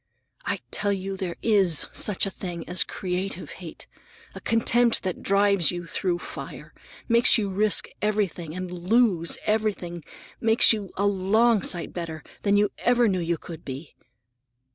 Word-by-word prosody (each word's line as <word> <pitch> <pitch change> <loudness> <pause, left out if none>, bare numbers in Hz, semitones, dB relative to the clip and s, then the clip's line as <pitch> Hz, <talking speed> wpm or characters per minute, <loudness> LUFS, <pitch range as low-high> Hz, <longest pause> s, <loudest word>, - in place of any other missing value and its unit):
I - - -2
tell 205 -1 0
you, 195 0 -3
there 185 -3 -4
is 195 -8 +4
such 210 -2 +2
a 195 - -4
thing 175 -3 -7
as 180 +1 +2
creative 185 0 -4
hate! 170 -4 -9 0.5
A - - -10
contempt 230 +1 +2
that 185 -2 -3
drives 200 -3 +3
you 175 -1 -4
through 175 +1 -2
fire, - - -6 0.3
makes 235 +1 +5
you 205 -3 -2
risk 210 +2 +3
everything 195 -6 -2
and 185 -1 -5
lose 180 -1 +2
everything, 205 -6 -2 0.4
makes 225 +1 +5
you 205 -3 -5
a 200 - +1
long 205 +3 +2
sight 175 -2 0
better 165 -3 -6 0.2
than 205 0 +2
you 205 0 +2
ever 245 -1 +3
knew 190 -3 0
you 170 0 -1
could 165 0 -10
be." 135 +4 -8
195 Hz, 155 wpm, -25 LUFS, 175-210 Hz, 0.5 s, makes